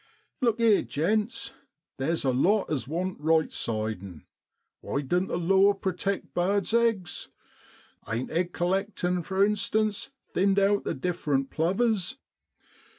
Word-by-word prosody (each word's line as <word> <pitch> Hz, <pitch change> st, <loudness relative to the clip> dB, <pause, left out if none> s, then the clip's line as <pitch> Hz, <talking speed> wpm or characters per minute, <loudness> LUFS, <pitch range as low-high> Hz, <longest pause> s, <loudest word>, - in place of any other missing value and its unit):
1 255 Hz, -, +1 dB
Look 230 Hz, 0 st, +1 dB
'ere, 225 Hz, -3 st, +5 dB
gents, 210 Hz, -, -1 dB, 0.5 s
theer's 160 Hz, +3 st, 0 dB
a 130 Hz, -, +3 dB
lot 190 Hz, +12 st, +2 dB
as 140 Hz, -4 st, -1 dB
want 180 Hz, +4 st, -3 dB
right 160 Hz, +1 st, +2 dB
sidin'. 110 Hz, -7 st, -4 dB, 0.5 s
Why 140 Hz, -, -2 dB
doan't 180 Hz, +7 st, 0 dB
the -, -, -2 dB
law 195 Hz, +3 st, +4 dB
protect 195 Hz, 0 st, -3 dB
birds' 195 Hz, +4 st, +1 dB
eggs? 230 Hz, -6 st, +1 dB, 0.8 s
Ain't 115 Hz, +3 st, -2 dB
egg 175 Hz, +2 st, 0 dB
collectin', 180 Hz, 0 st, 0 dB
for 190 Hz, +3 st, +2 dB
instance, 215 Hz, +1 st, 0 dB, 0.2 s
thinned 195 Hz, +1 st, +2 dB
out 200 Hz, +1 st, +3 dB
the -, -, -1 dB
different 150 Hz, -7 st, -1 dB
plovers 195 Hz, +6 st, +1 dB
185 Hz, 130 wpm, -27 LUFS, 160-205 Hz, 0.8 s, ere